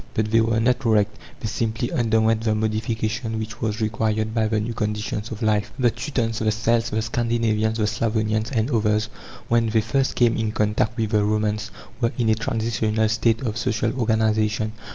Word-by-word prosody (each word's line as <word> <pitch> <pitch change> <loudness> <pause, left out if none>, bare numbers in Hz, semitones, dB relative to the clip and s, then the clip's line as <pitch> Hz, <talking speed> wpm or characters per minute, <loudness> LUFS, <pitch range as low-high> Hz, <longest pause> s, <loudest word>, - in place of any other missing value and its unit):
But 110 0 0
they 115 0 +5
were 115 0 +1
not 125 +3 +1
wrecked; 105 -2 +2 0.3
they 110 - -2
simply 115 +2 -2
underwent 110 -1 +2
the 110 -1 +1
modification 110 +1 -2
which 110 +1 -6
was 110 0 -2
required 110 0 0
by 110 -1 +1
the 110 0 0
new 115 +2 -3
conditions 105 0 -3
of 110 0 -6
life. 105 -1 +1
The 125 -3 +3
Teutons, 120 -2 -2
the 110 -1 +1
Celts, 115 +1 +1
the 110 0 -1
Scandinavians, 110 -1 0
the 105 - +1
Slavonians, 110 0 0
and 120 0 0
others, 110 -1 +1 0.4
when 115 -1 +2
they 110 0 +2
first 130 +5 0
came 120 -2 +3
in 110 -1 -1
contact 105 +2 0
with 110 -2 -1
the 105 -2 +3
Romans, 105 0 0 0.3
were 115 0 +2
in 115 -3 +1
a - - +5
transitional 110 0 0
state 110 +1 +1
of 115 -1 -2
social 115 -1 0
organization. 110 -1 +1
110 Hz, 185 wpm, -23 LUFS, 110-115 Hz, 0.4 s, they